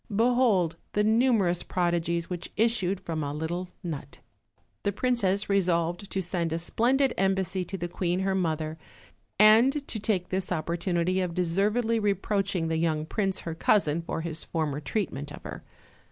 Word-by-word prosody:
Behold 225 -6 +2 0.2
the 210 - +2
numerous 220 -6 +3
prodigies 170 -1 -1
which 175 -1 -5
issued 210 -4 +2
from 165 -4 -3
a 140 - -3
little 175 +4 -3
nut! 145 -5 -6 0.6
The 200 - 0
princess 205 -3 +1
resolved 175 -1 +1
to 190 - -1
send 175 -2 -1
a 165 - 0
splendid 250 +10 +1
embassy 190 -1 +1
to 195 +3 -5
the 175 -1 -3
queen 175 +1 -1
her 190 0 0
mother, 160 -3 -1 0.6
and 235 +8 +5
to 220 - -1
take 195 -4 -1
this 185 0 -2
opportunity 175 +2 0
of 175 -2 -3
de 180 - +2
servedly 215 +6 +1
reproaching 200 -3 0
the 160 0 0
young 160 -2 0
prince 195 +2 -1
her 165 - -4
cousin 165 -2 +2
for 165 - -4
his 160 -1 -3
former 155 -4 -2
treatment 145 -5 -3
of - - -10
her. - - -8
185 Hz, 160 wpm, -27 LUFS, 165-205 Hz, 0.6 s, and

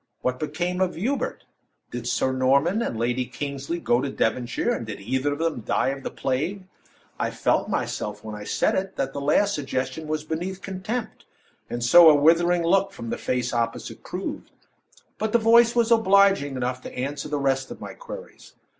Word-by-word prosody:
What 125 0 -1
became 175 +4 -2
of 185 -1 +1
Hubert? 250 +11 -2 0.5
Did - - -5
Sir 130 - +1
Norman 140 - +2
and 120 - -2
Lady 120 +2 0
Kingsley 140 +4 -4
go 120 -6 +2
to 140 - -2
Devonshire, 120 -1 0
and - - -2
did 110 - -6
either 130 +7 -1
of - - -5
them 160 -6 -1
die 120 - +1
of 135 0 -4
the - - -4
plague? 155 +10 -2 0.6
I - - 0
felt, - - 0
myself, 105 0 -3
when 110 - -7
I 105 0 -7
said - - +1
it, 190 0 -2
that 135 0 -2
the 140 - -4
last 200 +8 +3
suggestion 135 +1 -3
was 155 0 -2
beneath 180 +5 -4
contempt, 200 +5 -5 0.4
and 120 0 -3
so 170 +6 +9
a 155 - +7
withering 170 +4 +4
look 195 +3 +3
from 115 -11 -7
the - - -2
face 125 -1 -1
opposite 115 -1 -3
proved; - - -5 0.7
but 220 0 -1
the - - +7
voice 235 +1 +5
was 235 -1 +2
obliging 200 -9 +4
enough 125 0 -2
to - - -9
answer 140 +4 -3
the 145 - -1
rest 135 -1 0
of - - -8
my - - -7
queries. - - -11
145 Hz, 190 wpm, -25 LUFS, 130-190 Hz, 0.7 s, so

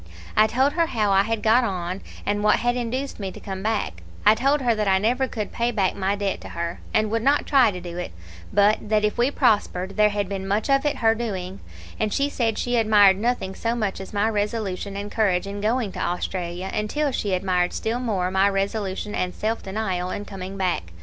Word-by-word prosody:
I 215 0 +6
told 265 +6 +2
her 335 -1 +2
how 215 -8 0
I 195 0 +5
had 220 +1 -2
got 230 +3 +5
on, 185 -3 -3 0.2
and 205 0 0
what 210 - +5
had 245 0 0
induced 250 +3 -3
me 195 -2 -4
to - - -10
come 190 -1 -6
back; 205 - -2 0.2
I 210 - +8
told 275 +6 +1
her 240 -3 +3
that 215 -2 -1
I 190 -1 +4
never 245 +6 +1
could 215 -5 -4
pay 235 +1 0
back 200 -6 0
my 195 +1 0
debt 200 -1 -2
to - - -9
her, 170 0 -4
and 215 -1 +1
would 225 0 0
not 280 +4 +2
try 265 -5 +5
to 180 -3 -5
do 175 0 -7
it, 180 - -5 0.4
but 205 +1 +3
that 215 -1 +3
if 210 +3 -1
we 245 +3 +4
prospered, 205 -8 +1
there 210 0 +5
had 205 -1 -2
been 195 0 -4
much 210 +7 0
of 275 +2 +3
it 290 - 0
her 225 - +6
doing; 195 -5 -4 0.4
and 215 -1 0
she 280 +5 +1
said 230 -6 -1
she 245 0 0
admired 205 -4 +5
nothing 225 -4 -1
so 230 +4 -2
much 210 -5 -2
as 190 - -9
my 205 +1 +1
resolution 205 -2 -2
and 205 +1 -5
courage 195 -4 +1
in 200 +1 -5
going 220 0 0
to - - -7
Australia, 180 +1 -3
until 280 +8 -1
she 205 -6 -1
admired 180 -1 +1
still 230 +2 -2
more 195 -7 -1
my 190 +1 +3
resolution 200 +1 -2
and 180 0 -2
self 220 +2 -2
denial 190 -3 -2
in 205 - -4
coming 195 -1 -7
back. 175 - -1
210 Hz, 225 wpm, -24 LUFS, 190-230 Hz, 0.4 s, I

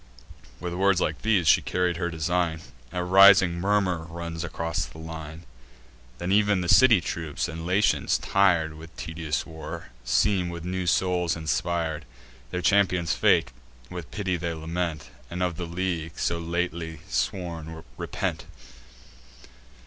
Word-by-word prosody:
With 90 -1 -4
words 95 0 +3
like 80 -3 -1
these, 105 -7 +2
she - - +6
carried 90 -2 0
her 85 0 -1
design: 80 0 -1 0.3
A 90 - -2
rising 95 -1 +7
murmur 95 -4 +1
runs 85 0 -5
along 85 -1 -4 0.2
the - - -13
line. 80 0 -8 0.7
Then 85 +2 -3
ev'n 105 -1 +3
the 90 - -3
city 115 +1 +7
troops, 80 -1 -3
and 80 0 -6
Latians, 100 +3 +2
tir'd 85 -5 +2
With 80 +1 -13
tedious 80 -2 -3
war, 80 -5 -8
seem 90 +9 +2
with 85 -1 -7
new 90 0 -2
souls 90 -1 +1
inspir'd: 80 -1 -2 0.4
Their 90 +4 -3
champion's 95 -5 +3
fate 60 - +3 0.4
with 90 -4 -7
pity 95 -4 -2
they 85 0 -3
lament, 80 0 -4 0.2
And 90 +1 -3
of 90 -3 -1
the 85 - -4
league, 85 -2 -3
so 85 - -1
lately 85 -1 -3
sworn, 80 +5 -3
repent. - - -3
85 Hz, 140 wpm, -26 LUFS, 80-90 Hz, 0.7 s, rising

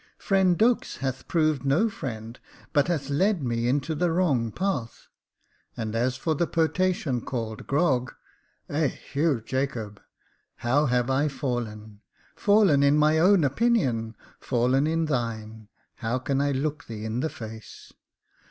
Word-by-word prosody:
Friend 190 -3 +2
Dux 235 +2 +2
hath 130 -1 -4
proved 155 -5 +1
no 140 +11 +3
friend, 115 - -6 0.3
but 145 -1 +3
hath 145 -5 -2
led 185 +3 +2
me 120 -1 -1
into 140 +4 0
the 175 +3 +1
wrong 140 -10 +1
path; 165 - -3 0.7
and 110 -1 -3
as 125 +2 0
for 160 +4 0
the 170 +3 0
potation 165 -5 0
called 115 -4 -5
Grog 135 -4 +1 0.3
— - - -43
Eheu 145 -3 -1
Jacobe 120 -6 -3 0.6
I - - -3
liow 145 +2 +3
have 125 +1 +1
I 140 +3 +2
fallen 110 -7 -4 0.2
— - - -34
fallen 200 -9 +4
in 140 +1 +4
my 155 +1 +4
own 185 0 +5
opinion 135 - +1
— - - -27
fallen 130 +3 +1
in 165 +1 +1
thine 110 -6 -3
— - - -43
how 120 +1 -1
can 135 +2 -1
I 145 0 +1
look 145 +2 -2
thee 110 -2 -7
in 110 +2 -2
the 160 - -1
face 110 -3 -10
135 Hz, 155 wpm, -26 LUFS, 120-160 Hz, 0.7 s, own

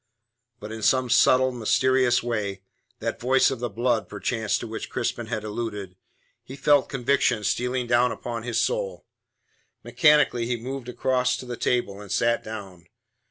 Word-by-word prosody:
But 105 +1 -8
in 110 0 -6
some 130 +2 +2
subtle, 130 +1 +5
mysterious 125 +1 +2
way 100 -5 -3 0.3
that - - -4
voice 130 +2 +3
of 130 - -4
the 120 0 -2
blood 120 +2 0
perchance 105 +2 -1
to - - -6
which 110 -1 -6
Crispin - - -3
had 110 - -3
alluded 105 -3 -5 0.5
he 130 - -10
felt 145 0 +3
conviction 125 -4 +1
stealing 125 +4 -1
down 120 +1 +3
upon 120 0 -5
his 115 0 -1
soul. 95 -8 -2 0.8
Mechanically 150 -6 +3
he 120 0 -1
moved 130 +1 -6
across 125 0 0
to - - -8
the 125 -1 -5
table, 115 -4 -1
and 100 -3 -10
sat 120 0 +1
down. 95 -6 -9
120 Hz, 160 wpm, -25 LUFS, 110-125 Hz, 0.8 s, subtle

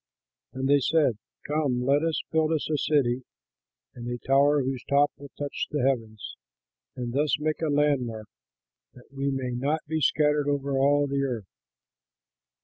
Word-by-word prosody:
And 130 +1 -2
they 145 +1 +5
said, 140 -6 +2 0.3
"Come, 145 -5 0
let 140 +2 +3
us 165 -1 0
build 160 0 +2
us 155 - -1
a 150 - +2
city, 130 -4 +1 0.7
and 120 -1 -8
a 120 - -3
tower 140 +4 +3
whose 130 -1 -3
top 145 +1 +4
will 140 0 -12
touch 145 -1 -3
the 145 -4 -1
heavens, 110 -6 -3 0.6
and 120 -1 -4
thus 150 +2 +1
make 155 +1 -2
a 160 - 0
landmark, 130 -7 0 0.7
that 125 +2 -18
we 140 0 -1
may 130 -2 -2
not 140 +6 -1
be 160 +1 -2
scattered 150 0 +2
over 140 -1 -1
all 145 +2 +3
the 140 0 -1
earth." 120 -7 -2
140 Hz, 160 wpm, -26 LUFS, 125-150 Hz, 0.7 s, they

